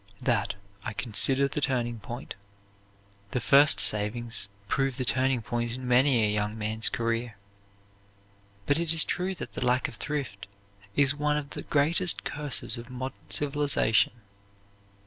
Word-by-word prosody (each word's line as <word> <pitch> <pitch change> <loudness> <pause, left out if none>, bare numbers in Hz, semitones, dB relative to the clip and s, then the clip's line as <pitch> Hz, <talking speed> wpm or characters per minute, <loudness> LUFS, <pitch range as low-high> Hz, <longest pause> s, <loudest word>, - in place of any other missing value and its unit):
That 115 -6 -1 0.3
I 110 - -5
consider 130 +5 +4
the 140 +2 -5
turning 120 -4 -2
point." 120 +3 -8 1.0
The 125 - 0
first 140 +5 +5
savings 105 0 +3 0.2
prove 135 +3 -1
the 130 - -3
turning 130 -1 0
point 120 0 -3
in 130 0 -7
many 125 -2 +3
a 105 - -1
young 105 +1 -2
man's 110 +1 +1
career. 115 -1 -3 1.3
But 145 +2 +1
it 165 -1 0
is 160 - +9
true 185 +1 -3
that - - -8
the - - -4
lack 125 +2 +1
of 120 -6 -11
thrift 135 -9 -5 0.5
is 145 -1 +3
one 150 0 -1
of 145 -1 -6
the - - -6
greatest 165 +5 +2
curses 145 -4 -4
of 120 +2 -11
modern 130 +1 -8
civilization. 145 -7 +1
125 Hz, 145 wpm, -27 LUFS, 115-145 Hz, 1.3 s, is